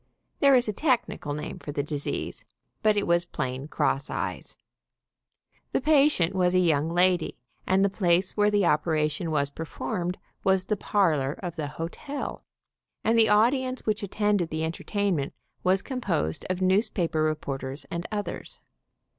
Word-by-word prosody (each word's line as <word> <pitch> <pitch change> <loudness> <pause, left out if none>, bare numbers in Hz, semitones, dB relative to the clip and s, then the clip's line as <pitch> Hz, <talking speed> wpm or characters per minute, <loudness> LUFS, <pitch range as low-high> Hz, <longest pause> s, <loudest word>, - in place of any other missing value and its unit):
There 280 -2 +6
is 245 -2 +3
a 215 - -1
technical 240 - 0
name 150 - -6
for 145 - -6
the 145 0 -1
disease, 145 -1 -4 0.4
but 215 -1 +3
it 205 - +1
was 170 0 +3
plain 135 -5 -4
cross 140 -2 0
eyes. - - -4 1.2
The - - +3
patient 280 - +4
was 180 -1 +2
a - - +5
young 160 -3 +2
lady, 180 0 +2 0.3
and 190 +1 +4
the - - +2
place 180 -1 +2
where 210 0 +4
the 205 -2 +2
operation 155 0 +1
was 140 -2 0
performed 175 +4 -4 0.3
was 190 -1 +3
the 210 +3 -1
parlor 160 -10 +1
of 175 -1 -6
the 155 -3 -3
hotel, 170 - -5 0.6
and 225 - +3
the 225 -1 +5
audience 255 +5 +2
which 215 0 0
attended 205 -3 0
the 160 0 -2
entertainment 170 -2 -1 0.3
was 190 +1 +2
composed 190 - -2
of 185 0 -1
newspaper 185 -4 +1
re 155 0 +2
porters 135 -1 -5
and 170 0 -3
others. 205 -4 -5
180 Hz, 155 wpm, -27 LUFS, 155-210 Hz, 1.2 s, There